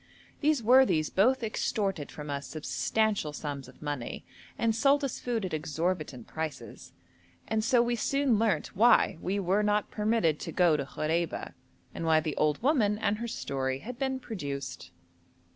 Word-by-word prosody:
These 295 -4 +2
worthies 240 -10 +4
both 245 +6 +3
extorted 195 -6 -1
from 150 -1 -7
us 140 -1 -4
substantial 195 +2 -1
sums 145 -2 -5
of - - -15
money 145 -5 -4 0.3
and 225 -1 +1
sold 280 +5 +3
us 275 - -2
food 235 -5 -2
at 185 - -5
exorbitant 155 -4 -2
prices, 160 -2 -6 0.6
and 220 0 0
so 235 +1 +4
we 240 0 0
soon 270 -1 +1
learnt 220 -2 0
why 220 -5 +4
we 195 +2 -1
were 195 +2 +2
not 210 0 +1
permitted 210 -8 +1
to - - -5
go 175 -4 +4
to 140 -2 -3
Khoreba, 160 +3 -2 0.4
and - - -5
why 160 -1 +4
the 155 -1 -3
old 150 +5 +1
woman 235 -8 +3
and 210 0 0
her 235 - -3
story 130 - -2
had 245 +1 -8
been 265 -1 -1
produced. 140 - -6
195 Hz, 160 wpm, -29 LUFS, 155-230 Hz, 0.6 s, worthies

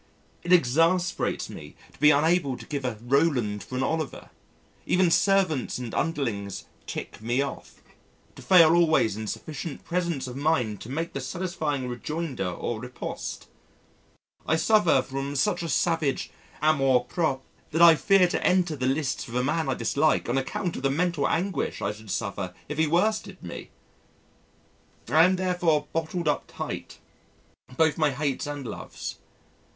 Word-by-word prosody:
It 175 - -4
exasperates 170 +3 +2
me - - -10 0.2
to - - -21
be 150 +1 +6
unable 150 -2 +3
to - - -11
give 140 -3 -4
a 120 -4 -2
Roland 120 -5 +1
for 130 - -8
an 130 - 0
Oliver 155 -1 -3 0.6
even 180 -2 +3
servants 190 -8 +2
and 125 -3 -6
underlings 115 - -2 0.2
"tick - - -6
me 120 +5 +1
off" 140 - -8 0.5
to - - -11
fail 165 -4 +6
always 160 - +3
in 110 0 -5
sufficient 150 +5 -6
presence 170 -6 -1
of 125 -1 -7
mind 130 - 0
to 110 - -8
make 165 +5 -3
the 135 - -3
satisfying 155 -3 -3
rejoinder 130 - -3
or 110 +6 -4
riposte. 125 +2 -6 1.0
I 160 - +3
suffer 170 -7 +4
from 135 +2 -4
such 175 +6 +1
a 165 - -4
savage 165 -6 0 0.3
amour 135 -5 +4
propre 135 -1 -1 0.3
that 165 +3 +3
I 170 -1 +10
fear 180 +5 +4
to - - -2
enter 180 -3 +2
the 130 -2 -1
lists 135 0 -1
with 115 - -8
a 125 - +1
man 150 +2 0
I 130 - +1
dislike 145 +6 +1
on 120 - 0
account 135 +7 -2
of - - -5
the 135 - +1
mental 165 0 +1
anguish 180 -2 -1
I - - -1
should 105 0 -12
suffer 100 -1 -3
if 150 +1 -5
he 160 - +3
worsted 210 +7 0
me. 85 - -8 1.4
I 160 +2 +6
am 185 +1 +3
therefore 180 -5 +1
bottled 165 +1 -2
up 150 - +1
tight - - -6 0.8
both 160 -1 +3
my 155 -1 +4
hates 140 0 -2
and 145 -2 -5
loves. 110 - -7
150 Hz, 160 wpm, -26 LUFS, 130-170 Hz, 1.4 s, I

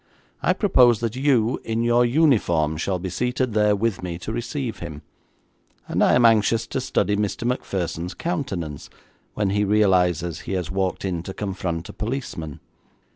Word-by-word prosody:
I - - +3
propose 125 - +4
that 115 0 -2
you, 130 -4 +2
in 115 +1 -1
your 120 +1 +4
uniform, 115 - +2
shall 90 +4 -1
be 90 +1 -5
seated 125 +4 -1
there 105 -1 +3
with 110 -1 -1
me 90 -2 -4
to 90 - -6
receive 120 -2 -4
him, 80 -3 -8 0.8
and - - +1
I - - +4
am 120 -1 +5
anxious 115 0 +4
to 130 - -3
study 105 -5 0
Mr. 105 +2 -2
Macpherson's 90 -7 -2
countenance 100 - -4 0.5
when 100 -2 0
he 105 +1 +1
realises 90 -5 +2
he - - -6
has 90 -3 -2
walked 95 0 -1
in 90 -3 -2
to 95 +3 -8
confront 95 -4 -3
a - - -9
policeman. 105 - -5
105 Hz, 165 wpm, -23 LUFS, 90-120 Hz, 0.8 s, am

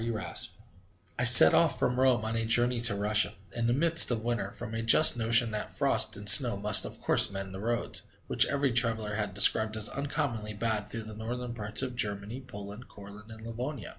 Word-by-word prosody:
E. 115 - -7
Raspe 110 -2 -7 0.7
I - - -3
set 115 -10 +8
off 165 -3 -1
from 125 0 -4
Rome 125 -4 -1
on 110 +1 -6
a 115 - -4
journey 120 +1 -2
to 115 -3 +6
Russia, 105 +1 0 0.2
in 120 -1 -4
the 120 - -2
midst 165 +4 +4
of 115 -3 -5
winter, 120 -4 -6
from 110 - -12
a 115 - -6
just 115 +7 +4
notion 115 0 +1
that 105 0 -7
frost - - +2
and 100 0 -12
snow 120 +1 +6
must, 105 0 +3
of - - -12
course, - - +2
mend 95 -1 -10
the 95 - -11
roads, 115 +3 -6 0.2
which - - 0
every 140 -1 -4
traveller 115 -3 -1
had 105 -3 -7
described 110 +2 +4
as 110 - -5
uncommonly 135 -7 -7
bad 105 -1 -6
through 115 +1 -8
the 110 0 -13
northern 120 +3 -9
parts 110 +1 -5
of 125 -2 -8
Germany, 105 +2 -6
Poland, 105 -2 -14
Courland, 100 +2 -17
and 110 0 -15
Livonia. 120 +3 -9
115 Hz, 210 wpm, -25 LUFS, 105-120 Hz, 0.7 s, set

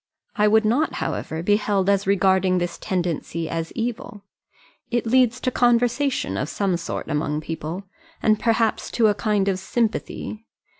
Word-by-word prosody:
I 210 0 +3
would 220 +1 +4
not, 270 +8 +2
however, 160 +1 -3
be 205 +3 +4
held 200 -3 0
as 200 -1 +2
regarding 190 -1 +3
this 175 -1 -3
tendency 170 -2 -2
as 165 0 -3
evil. 225 -3 -4 0.7
It 240 -1 0
leads 250 0 +3
to 255 - 0
conversation 245 - +1
of 135 +9 -2
some 195 -3 0
sort 165 - -5
among 150 0 -1
people, 165 +4 -5 0.4
and 215 -1 +2
perhaps 225 -1 +1
to 225 -3 +4
a - - +3
kind 205 -2 0
of 190 -1 0
sympathy. 220 0 -2
205 Hz, 155 wpm, -23 LUFS, 175-230 Hz, 0.7 s, would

